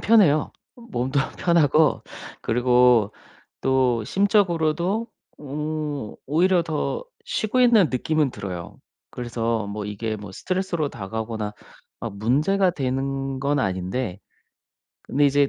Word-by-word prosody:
편해요. 185 -10 +4 0.2
몸도 140 - -2 0.2
편하고 160 -3 +3 0.4
그리고 125 -2 +4 0.5
또 130 -3 +2
심적으로도 190 - +1 0.3
음 150 -3 -4
오히려 175 +4 +3
더 160 - -2 0.2
쉬고 255 - 0
있는 235 -7 +6
느낌은 150 +2 +1
들어요. 90 -3 -7 0.3
그래서 115 -2 -2
뭐 105 0 -4
이게 110 +2 -3
뭐 100 -2 -9
스트레스로 180 - -1
다가오거나 110 0 -4 0.6
문제가 150 - +2
되는 135 -1 -2
건 140 +2 0
아닌데 95 +1 -2 0.8
근데 145 +1 +1
이제 140 0 +4
140 Hz, 240 characters per minute, -24 LUFS, 115-170 Hz, 0.8 s, 있는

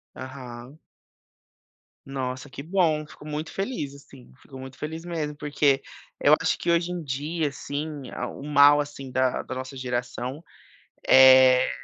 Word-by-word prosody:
Aham. 130 +1 -9 1.3
Nossa, 130 0 -5
que 140 - -8
bom. 160 -3 +1
Fico 150 - -15
muito 150 +1 -5
feliz, 195 - -4
assim, 140 -2 -16
fico 135 - -13
muito 130 0 -10
feliz 160 +2 -6
mesmo, 155 -4 -4
porque 145 -2 +1 0.4
eu 145 - +6
acho 165 -1 +1
que 170 - 0
hoje 170 +1 +1
em 175 -2 -4
dia, 150 +3 -2
assim, 145 0 -6
ah, - - -4
o 135 - -10
mal, 145 0 +6
assim, 140 -3 -5
da 130 -1 +1
da 130 - -6
nossa 130 +1 -6
geração 125 +3 -4 0.6
é 130 -1 +7
140 Hz, 145 wpm, -25 LUFS, 130-155 Hz, 1.3 s, é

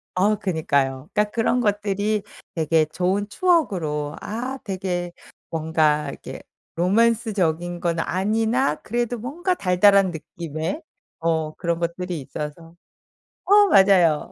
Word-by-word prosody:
어 205 +4 +3
그니까요. 140 -7 -1
그니까 210 0 +2
그런 235 +2 +1
것들이 205 -1 0 0.3
되게 160 -1 +2
좋은 185 +6 -1
추억으로 180 - 0
아 250 +5 -4
되게 185 -3 -3 0.4
뭔가 155 -2 +1
이렇게 - - -9 0.3
로맨스적인 185 -4 +1
건 170 -1 -1
아니나 220 - +1
그래도 240 +1 -2
뭔가 330 - -2
달달한 195 - +4
느낌의 160 - -5 0.4
어 160 -2 -1
그런 170 -1 -2
것들이 175 0 -3
있어서 150 +4 -7 0.7
어 410 +1 +6
맞아요. 185 - +4
180 Hz, 260 characters per minute, -23 LUFS, 160-215 Hz, 0.7 s, 어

